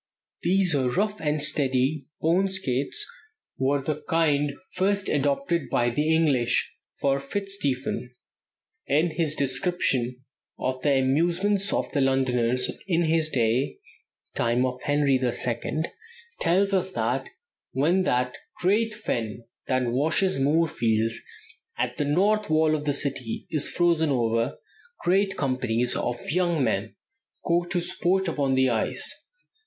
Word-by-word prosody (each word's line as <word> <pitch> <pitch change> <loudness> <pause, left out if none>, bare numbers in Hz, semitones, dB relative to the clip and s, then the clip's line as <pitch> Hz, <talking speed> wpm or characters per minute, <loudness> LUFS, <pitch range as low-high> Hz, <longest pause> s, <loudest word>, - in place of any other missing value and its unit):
These 185 0 +3
rough 185 +11 0
and 150 -1 0 0.2
ready 135 +1 0
bone 175 +5 +2
skates 190 - -1 0.5
were 135 +1 +1
the 150 +1 -3
kind 150 -3 +2 0.2
first 200 +1 0
adopted 145 +3 0
by 120 0 +1
the 150 +6 0
English; 140 -7 +2 0.3
for 140 0 +1
Fitzstephen, 140 -6 -2 0.8
in 160 +4 +2
his 155 -1 -1
description 130 -4 0 0.3
of 130 0 -2
the 145 -2 +3
amusements 175 +9 +1
of - - -1
the 145 - +1
Londoners 125 -2 +2 0.2
in 170 -2 +2
his 160 -1 +2
day 120 0 0 0.6
(time 120 +2 +1
of 125 0 -4
Henry 145 -2 +2
the 125 -1 +1
Second), 125 +8 -1 0.5
tells 195 +4 +2
us 190 0 0
that 125 +2 -1 0.4
"when 165 +8 +2
that 125 -8 0 0.2
great 210 +4 +1
fen 120 - -3 0.2
that 130 -1 +1
washes 150 - +1
Moorfields 120 -7 +1 0.6
at - - -2
the 145 - 0
north 205 +8 +2
wall 155 0 +3
of 150 -1 -4
the 145 - +1
city 135 -4 -2
is 150 -3 0
frozen 170 -3 +2
over, 115 -1 0 0.5
great 190 +2 +2
companies 125 -3 0
of 120 - -1
young 175 -3 +1
men 110 -2 -1 0.5
go 175 0 +2
to 175 0 -1
sport 190 +2 0
upon 140 -5 0
the 130 0 +4
ice. 115 -3 0
145 Hz, 130 wpm, -25 LUFS, 130-175 Hz, 0.8 s, the